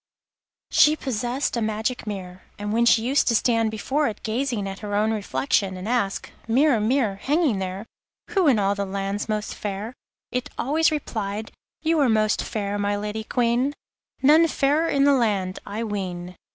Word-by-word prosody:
She 300 +1 +6
possessed 250 -1 -2
a 235 - -1
magic 220 +2 -2
mirror, 185 -3 -6 0.2
and 205 0 -3
when 235 +1 +3
she 225 - +5
used 270 +4 +2
to 235 - +3
stand 230 -1 +2
before 270 +7 0
it 220 - -6
gazing 230 -2 -1
at 195 0 -6
her 205 -2 -4
own 215 +2 +2
reflection 205 -2 0
and 185 +3 -6
ask: 230 -5 -1 0.2
'Mirror, 260 +1 +3
mirror, 220 -1 +1
hanging 280 - +1
there, 190 +2 -4 0.5
Who 380 -5 +3
in 260 -6 +5
all 200 -1 +2
the 200 0 -2
land's 195 +2 -3
most 215 0 -2
fair?' 205 +3 -5 0.4
it 250 0 -2
always 310 +5 +2
replied: 220 -7 -3 0.3
'You 325 0 +2
are 275 -4 +4
most 215 -1 +2
fair, 205 -1 -3
my 205 0 0
Lady 210 +1 -4
Queen, 245 +4 +1 0.5
None 310 +4 +6
fairer 300 +2 +1
in 275 - +2
the 285 0 +5
land, 205 -7 0
I 210 +3 -3
ween. 180 -4 -4
220 Hz, 175 wpm, -24 LUFS, 205-265 Hz, 0.5 s, She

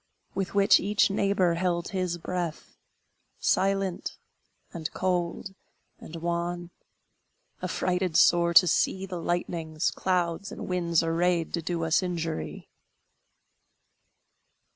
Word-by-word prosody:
With 195 0 -3
which 200 0 +6
each 205 +1 +2
neighbor 195 -3 +2
held 175 0 -1
his 185 -3 -2
breath, 175 -1 -4 0.6
Silent, 195 -1 0 0.6
and 160 -2 -4
cold, 180 +1 -1 0.5
and 165 - -10
wan, 170 +1 -3 0.9
Affrighted 180 -2 0
sore 170 0 +4
to 180 - +9
see 190 +3 +1
The 180 -3 -6
lightnings, 165 -2 -1
clouds, 180 0 -1
and - - -7
winds 170 -3 +1
arrayed, 170 0 +1
To 170 - -1
do 165 0 -2
us 160 +3 +2
injury! 165 - -4
175 Hz, 105 wpm, -27 LUFS, 170-185 Hz, 0.9 s, to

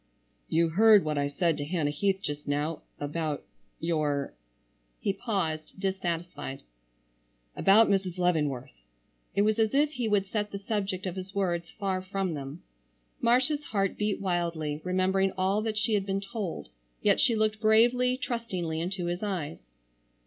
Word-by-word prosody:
"You 165 0 +3
heard 210 +2 +6
what 150 -1 0
I 140 - +1
said 160 +2 +1
to 145 - -2
Hannah 150 -1 0
Heath 195 +5 0
just 145 -2 -4
now, 145 +2 -1 0.2
about—your——" 150 0 -3 0.7
He 200 - 0
paused, 190 -7 -2
dissatisfied—"about - - -1
Mrs. 190 -3 0
Leavenworth"—it 120 - -2
was 215 +1 +2
as 220 +2 +2
if 295 +1 +4
he 250 -6 -2
would 205 -2 +2
set 210 +1 -2
the 200 - -5
subject 195 -2 -2
of 185 -1 -3
his 190 +1 -7
words 175 -3 0
far 190 -3 -2
from 190 -1 -2
them. 140 +3 -7 0.6
Marcia's 260 +5 +2
heart 195 -3 0
beat 210 -1 -1
wildly, 170 -5 -1
remembering 185 +1 +1
all 190 +3 +2
that 215 -1 -2
she 220 +1 +2
had 200 -2 +1
been 195 0 0
told, 195 - -5 0.3
yet - - +4
she 230 - +4
looked 215 0 +1
bravely, 245 +3 +4
trustingly 185 -11 -3
into 180 +1 -2
his 175 +1 -2
eyes. 160 - -4
185 Hz, 145 wpm, -29 LUFS, 150-205 Hz, 0.7 s, heard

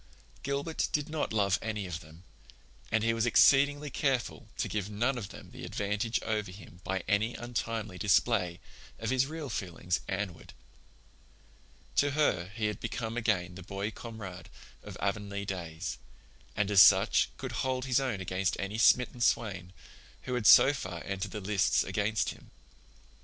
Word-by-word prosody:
Gilbert 140 +4 -1
did 150 +1 -1
not 155 -1 -2
love 105 -1 +2
any 105 -3 -3
of 90 -2 -4
them, 80 0 -15 0.7
and 110 -1 +2
he 115 0 +2
was 115 +1 0
exceedingly 145 +4 +5
careful 135 -4 -1
to - - -1
give 105 -2 -3
none 120 +6 0
of 115 -6 -5
them - - -12
the - - -10
advantage 105 +3 -1
over 105 -2 -1
him 90 -2 -13
by 95 0 -2
any 105 +3 +1
untimely 115 -5 -4
display 95 -3 +2 0.4
of - - -3
his 130 0 +2
real 155 -1 -5
feelings 90 -5 -2
Anne 95 -1 -2
ward. - - -15 1.4
To 145 - +4
her 90 - +2
he 110 -2 -1
had 105 -2 -2
become 115 -1 -4
again 105 -7 0
the 95 - -9
boy 100 +3 -4
comrade 105 -7 -9 0.3
of - - -9
Avonlea 100 0 -2
days, 90 -1 -5 0.6
and 105 0 0
as 100 -2 +8
such - - +6
could - - -5
hold 130 -1 -1
his 130 0 +2
own 125 -8 -2
against 95 +1 -1
any 100 +3 -3
smitten 125 +1 +4
swain 95 -7 0 0.5
who 125 - -4
had 120 -4 +1
so 135 - +8
far 95 -10 -6
entered 95 0 -3
the 105 - -6
lists 100 +1 +2
against 105 +2 0
him. - - -10
105 Hz, 165 wpm, -30 LUFS, 95-120 Hz, 1.4 s, as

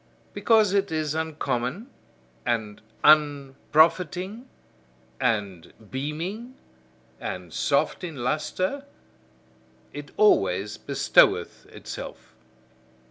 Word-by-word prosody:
Because 220 -4 +3
it 200 -2 +1
is 155 -2 -1
uncommon, 160 - -3 0.6
and 110 -3 -2 0.2
unprofiting, 155 - +2 0.7
and 100 -8 -2 0.2
beaming, 170 - -5 0.6
and 90 -3 -6
soft - - 0
in 165 -3 -5
lustre; 185 - -2 1.1
it 145 0 -8
always 105 - +3
bestoweth - - +2
itself. - - -9
155 Hz, 75 wpm, -25 LUFS, 125-185 Hz, 1.1 s, Because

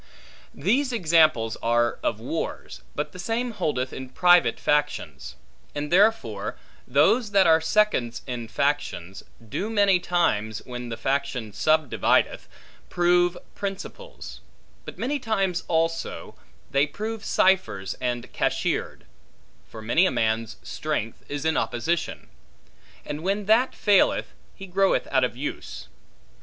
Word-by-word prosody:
These 250 - +1
examples 155 - +3
are 120 0 +1
of - - -1
wars, - - -5
but 150 - -3
the 180 - -11
same 230 +5 -2
holdeth 130 - -2
in 130 -1 -7
private 175 -5 +4
factions. 75 - -1 0.4
And 145 0 -4
therefore, 180 - +2 0.3
those 180 - +3
that 195 -1 +5
are 160 -1 +5
seconds 160 - +1
in 120 -3 -5
factions, 125 -10 -2 0.3
do 195 - -3
many 200 -4 +3
times, 110 -13 0
when 125 -1 -6
the 115 - -5
faction 135 -5 -2
subdivideth, 155 +7 +1 0.4
prove 175 0 +2 0.2
principals; 190 - -7 0.4
but - - -9
many 280 +5 -1
times 195 -7 -1
also, 165 0 -1 0.4
they 140 +2 +3
prove 215 +7 -5
ciphers 190 - +1
and 120 -1 -3
cashiered; - - -1 0.6
for 110 - -10
many 160 +12 +3
a - - 0
man's 110 0 -1
strength 150 -8 -4
is 145 +1 -4
in 160 -1 +2
opposition; 160 +8 -2 0.8
and 150 +1 -5
when 200 +3 -1
that 225 +5 +3
faileth, 205 -2 +2 0.2
he 195 - -9
groweth 195 +1 +1
out 130 -1 +3
of 125 -1 -1
use. 60 - -6
155 Hz, 125 wpm, -25 LUFS, 120-195 Hz, 0.8 s, that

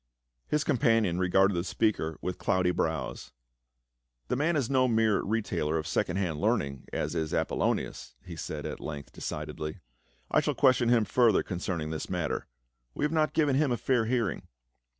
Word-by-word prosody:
His 150 -1 +1
companion 115 - +2
regarded 95 +2 +3
the 85 -1 -1
speaker 90 -5 0
with 90 - -4
cloudy 95 -2 +2
brows. 80 -8 -3 1.0
"The - - +1
man 155 +6 +1
is 140 -6 +1
no 130 -1 +3
mere 110 -3 +3
retailer 90 -8 -1
of 80 - -3
second 90 +3 0
hand 85 -6 -1
learning, 75 - 0
as - - -2
is 80 -2 -1
Apolonias," - - -1
he - - -7
said - - -5
at - - -5
length 70 -2 -7
decidedly. 75 0 -5 0.3
" - - -35
I - - +5
shall - - -1
question 130 -4 +4
him 115 -3 +4
further 120 -4 +3
concerning 85 -4 -3
this 80 - -4
matter; 85 -6 -2 0.5
we - - 0
have 150 - 0
not 155 -1 +1
given 145 -4 +2
him 145 -1 +2
a 120 - +1
fair 125 -3 +1
hearing." 115 -4 -1
100 Hz, 170 wpm, -29 LUFS, 80-120 Hz, 1.0 s, I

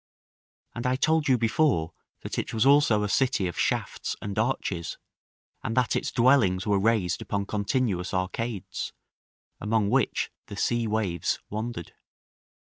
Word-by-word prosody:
And 120 +1 -3
I 130 - +2
told 160 +3 +2
you 130 -2 +4
before 115 - +1 0.3
that - - -4
it - - -4
was 110 +2 +2
also 135 -7 +5
a - - 0
city 125 -2 +1
of 85 - -3
shafts - - -1
and 100 0 -4
arches, 105 -8 -1 0.7
and 115 - -3
that 125 -1 +2
its - - -1
dwellings 120 -8 +3
were 100 -2 +2
raised 105 -4 +1
upon 100 -1 -2
continuous 100 -3 -1
arcades, 95 +1 -3 0.7
among 105 -1 +1
which 130 -3 +1 0.2
the 100 - -8
sea 120 +1 +1
waves 100 -6 0
wandered. 110 -4 -5
110 Hz, 140 wpm, -27 LUFS, 100-125 Hz, 0.7 s, also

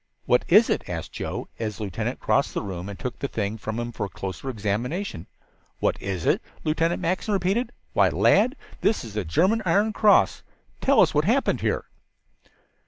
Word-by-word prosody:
"What 125 - +3
is 210 +6 +6
it?" - - -2
asked 80 -2 -5
Joe, - - -4
as 110 -3 -3
the - - -5
lieutenant 95 -4 -3
crossed - - +1
the - - -1
room 95 -1 -5
and 100 - -7
took 125 -2 -5
the 140 - -2
thing 110 -2 -3
from 110 +2 -4
him 120 0 -3
for 105 - -3
a - - -15
closer 95 +8 -6
examination. 115 - -3 0.5
"What - - 0
is 95 -4 -3
it?" - - +3 0.2
Lieutenant 165 +2 0
Mackinson 190 +4 0
repeated. 195 +6 0 0.2
"Why, - - +4
lad, 235 +7 +3 0.3
this 215 - +2
is 110 - -9
the 105 -1 -1
German 185 - +2
iron 200 +5 +2
cross! 210 0 +4 0.4
Tell 275 +1 +5
us 175 - +4
what 150 0 +2
happened 250 +8 +2
here." - - 0
130 Hz, 185 wpm, -25 LUFS, -, 0.5 s, is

